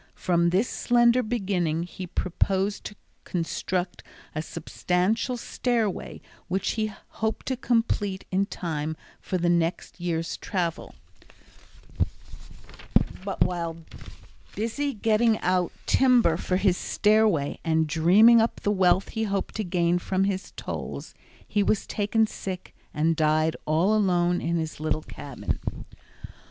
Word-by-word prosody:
From 170 -1 +2
this 190 +7 +2
slender 240 0 +3
beginning 190 -8 -1
he 180 +1 -7
proposed 190 +3 -1
to 210 - -6 0.3
construct 175 +1 -2 0.3
a 155 - -2
substantial 180 - -1
stairway 235 -4 -2 0.3
which 190 +2 0
he 215 -1 -1 0.2
hoped 220 0 -3
to 260 - -1
complete 225 -5 0
in 195 +1 +1
time 160 -4 -3 0.2
for 185 - -2
the 175 0 0
next 170 +1 0
year's 165 -1 -2
travel, 175 -4 -3 2.3
but 195 0 -5
while 170 -2 -3 0.8
busy 270 +6 -2
getting 220 +1 +3
out 180 -1 +1
timber 250 -10 +4
for 185 +2 -1
his 185 -2 +2
stairway 210 -9 +2
and 160 -1 +2
dreaming 190 +10 +6
of 225 - +3
the 205 - +2
wealth 190 -1 +3
he 220 -1 -2
hoped 200 -2 -2
to 215 - -2
gain 175 -1 +1
from 190 +2 0 0.3
tolls, - - -6 0.3
he 205 - +1
was 205 +1 +1
taken 220 +2 +1
sick 190 -3 -6 0.2
and 160 +2 +1
died 155 +1 +2
all 165 +7 +3
alone 180 -4 +2
in 170 +1 -1
his 160 -2 -4
little 155 0 -1
cabin. 140 -4 -5
185 Hz, 125 wpm, -26 LUFS, 170-215 Hz, 2.3 s, dreaming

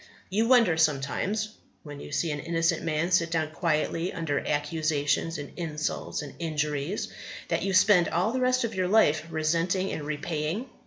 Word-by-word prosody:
You 220 +4 +2
wonder 230 -10 +5
sometimes 160 +8 0 0.3
when 145 -2 -9
you - - -9
see 160 +2 0
an 145 - -3
innocent 165 +1 0
man 165 +2 -1
sit 170 -2 +3
down 160 -2 -1
quietly 165 +1 0
under 160 -4 -1
accusations 150 +1 0
and 145 -1 -8
insults 155 -2 -3
and 145 - -9
injuries 150 +2 -2 0.4
that - - 0
you 195 - -1
spend 185 -2 +5
all 180 +6 +1
the 255 +1 -1
rest 255 0 +2
of 230 -1 -2
your 185 -2 0
life 165 -6 +3
resenting 165 +4 0
and - - -4
repaying. 155 - -3
165 Hz, 165 wpm, -27 LUFS, 150-185 Hz, 0.4 s, wonder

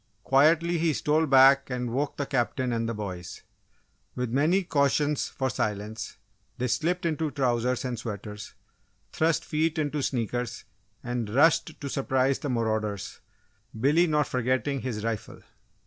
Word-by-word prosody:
Quietly 165 +5 +3
he 165 -1 +2
stole 155 +3 +1
back 135 0 +6
and 125 -2 -3
woke 140 +2 -1
the 145 - -1
Captain 125 -1 -1
and 115 0 -1
the - - -2
boys. 90 -4 -6 0.7
With 125 -2 -2
many 160 +9 +2
cautions 145 -2 +1
for 130 - -2
silence, 105 -1 -3 0.4
they 125 0 -1
slipped 170 +10 0
into 160 -1 0
trousers 125 -2 0
and 125 -3 -3
sweaters, 105 -2 -7 0.6
thrust 160 0 +1
feet 160 +2 0
into 150 -1 -1
sneakers, 120 -2 -2 0.4
and 120 -3 -3
rushed 150 +5 +3
to 140 - -5
surprise 135 -1 +1
the 145 - -4
marauders 110 -4 -2 0.6
Billy 150 +8 +4
not 150 -2 +2
forgetting 130 +3 -1
his 115 -5 -4
rifle. 115 -2 -4
130 Hz, 140 wpm, -27 LUFS, 115-150 Hz, 0.7 s, back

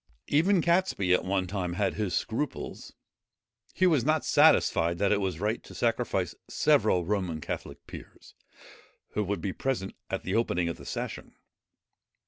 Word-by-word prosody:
Even 170 +4 +3
Catesby 170 - +2
at 90 - +2
one 95 0 0
time 90 -2 -3
had 100 +3 0
his 100 -5 -2
scruples. 120 +10 -3 0.8
He 185 - +3
was 155 -9 +3
not 155 +3 +1
satisfied 85 +1 +4
that 100 +1 +1
it 105 -1 +2
was 95 -4 -2
right 105 +4 -1
to - - -13
sacrifice 115 -7 0 0.2
several 90 -2 +3
Roman 95 -5 -1
Catholic - - -6
peers, - - -12 0.8
who 105 - -1
would 100 -2 -2
be 95 0 -2
present 125 -8 -2 0.2
at - - -3
the 95 - -3
opening 90 -7 +1
of 85 - -4
the - - -12
session. - - -5
100 Hz, 155 wpm, -28 LUFS, 90-125 Hz, 0.8 s, satisfied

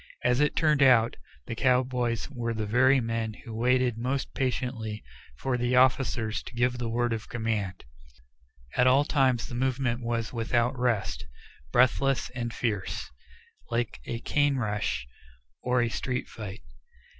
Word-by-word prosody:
As 125 - +3
it 150 0 +2
turned 150 -3 +3
out, 125 -4 +5 0.3
the - - -4
cowboys 125 -1 +1
were 115 -3 -3
the 110 -1 -2
very 130 +5 +4
men 115 -2 -2
who 115 - -7
waited 125 0 +2
most 130 +3 -2
patiently 125 -5 -2 0.3
for 125 - -1
the 125 +1 +1
officers 125 -3 +2
to - - -11
give 125 +1 +1
the 120 -1 -2
word 120 +1 0
of 110 -1 -5
command. 110 -5 -2 0.9
At 125 - +4
all 135 +3 +5
times 130 -6 +2
the - - -8
movement 125 -1 0
was 115 -1 -2
without 120 +2 +1
rest, 120 -5 -1 0.4
breathless 130 - +2
and 120 -2 -4
fierce, 105 - -3 0.6
like 115 -9 -2
a 115 - -4
cane 145 +1 +2
rush, 105 - -2 0.5
or 125 0 +2
a 120 - 0
street 125 +2 -3
fight. 105 -2 -8
120 Hz, 145 wpm, -28 LUFS, 115-130 Hz, 0.9 s, out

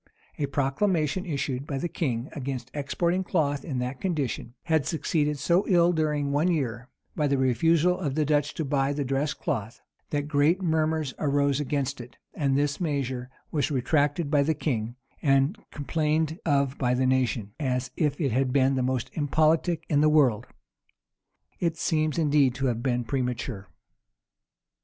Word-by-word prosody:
[] - - -30
A 145 - 0
proclamation 150 +5 0
issued 140 -3 -2
by 140 - -3
the 155 - -1
king 130 -7 -2
against 130 -3 -5
exporting 170 +6 0
cloth 145 -6 0
in 140 -6 -4
that 125 +1 -3
condition, 145 -9 -2
had 160 -4 +1
succeeded 150 -1 0
so 175 +6 +2
ill 175 -1 +4
during 150 -3 0
one 145 +5 +2
year, 125 -7 -1 0.3
by 150 - +1
the 140 0 +1
refusal 165 +7 +3
of 145 -7 -2
the 155 -1 +1
Dutch 150 0 +1
to 160 - -2
buy 135 0 +1
the 145 -1 -2
dressed 135 +3 -1
cloth, 115 -4 -3 0.3
that 145 -1 -2
great 150 +4 +3
murmurs 160 -5 0
arose 140 -1 +1
against 140 -2 -2
it; 120 0 -13 0.2
and 140 -2 +1
this 145 +3 0
measure 130 -6 -2 0.2
was 145 -4 0
retracted 145 +3 +1
by 145 -2 +4
the 155 +3 +1
king, 120 -6 -2 0.3
and 135 +4 +3
complained 155 +2 -1
of 140 -2 +1
by 125 -2 +2
the 130 +1 +1
nation, 125 -5 0
as 130 -3 -1
if 150 -4 0
it 140 -6 0
had 130 +2 +1
been 135 0 +3
the 130 - 0
most 130 -1 -1
impolitic 155 +3 +1
in 145 -2 +2
the 155 - +5
world. 130 -8 +3 1.1
It 165 -2 0
seems 155 -2 0
indeed 145 -5 +3
to 135 +1 -2
have 120 -3 0
been 125 -1 0
premature. 125 -5 -3
145 Hz, 165 wpm, -27 LUFS, 130-155 Hz, 1.1 s, the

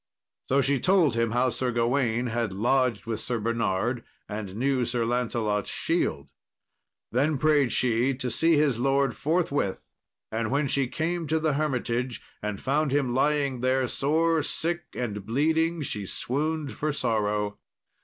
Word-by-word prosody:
So 140 +2 +4
she 135 0 +2
told 180 - +3
him 115 0 +1
how 125 +2 +2
Sir 125 0 -1
Gawain 120 0 +1
had 115 -2 -1
lodged 120 +2 +1
with 115 -1 -3
Sir 120 - -1
Bernard, 115 +1 -1 0.2
and 105 -3 -5
knew 130 +2 +1
Sir 120 -1 -1
Lancelot's 115 -4 -1
shield. - - -1 0.8
Then 145 +5 +2
prayed 145 -3 +3
she 125 +2 +2
to 125 -1 -3
see 165 -1 +4
his 140 -6 +2
lord 135 0 +2
forthwith, 145 - 0 0.5
and 110 0 -1
when 140 +2 +1
she 135 -1 +1
came 165 +4 -2
to 160 +2 +1
the 155 -1 +1
hermitage 125 -4 -1 0.2
and 105 -1 -3
found 145 +1 0
him 135 -3 +1
lying 140 -1 +1
there 130 0 +2
sore 160 +5 +1
sick 170 +3 -1
and 105 -5 -3
bleeding, 160 - +1
she 105 -7 -4
swooned 150 +5 -2
for 155 0 -2
sorrow. 105 -5 -1
130 Hz, 150 wpm, -27 LUFS, 115-150 Hz, 0.8 s, So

